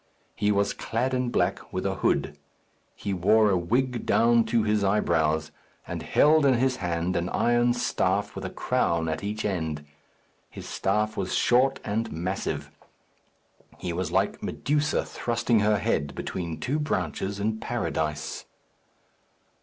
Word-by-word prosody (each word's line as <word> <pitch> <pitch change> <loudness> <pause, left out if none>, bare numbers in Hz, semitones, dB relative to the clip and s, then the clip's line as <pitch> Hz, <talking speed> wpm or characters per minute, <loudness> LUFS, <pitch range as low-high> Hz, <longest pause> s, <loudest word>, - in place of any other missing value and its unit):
He 105 - +1
was 100 0 +1
clad 125 +3 -2
in 125 -1 0
black, - - -1
with - - -3
a - - +1
hood. - - 0 0.6
He 100 - -3
wore 105 +4 +4
a - - +3
wig 120 +8 0
down 115 0 +4
to 115 0 +1
his 105 -1 +1
eyebrows, 80 -6 +1 0.3
and - - -5
held 155 +1 +4
in 135 -2 +5
his 130 +1 +1
hand 90 0 -1
an 85 +1 -1
iron 120 0 +2
staff - - 0
with - - -6
a - - -3
crown 85 -1 0
at 80 +2 -3
each 105 +2 -3
end. 80 -7 -2 0.6
His - - -9
staff 105 +2 0
was 95 -2 -2
short 130 +2 +3
and 110 +2 -2
massive. 90 +4 -3 1.1
He 90 - -4
was 90 +2 -2
like - - 0
Medusa 150 +1 0
thrusting 120 -1 0
her 105 0 +3
head 70 -1 -1
between 85 -4 -4
two 135 - -1
branches 100 - -2
in 110 +2 -1
Paradise. 75 -6 -3
105 Hz, 145 wpm, -26 LUFS, 85-120 Hz, 1.1 s, in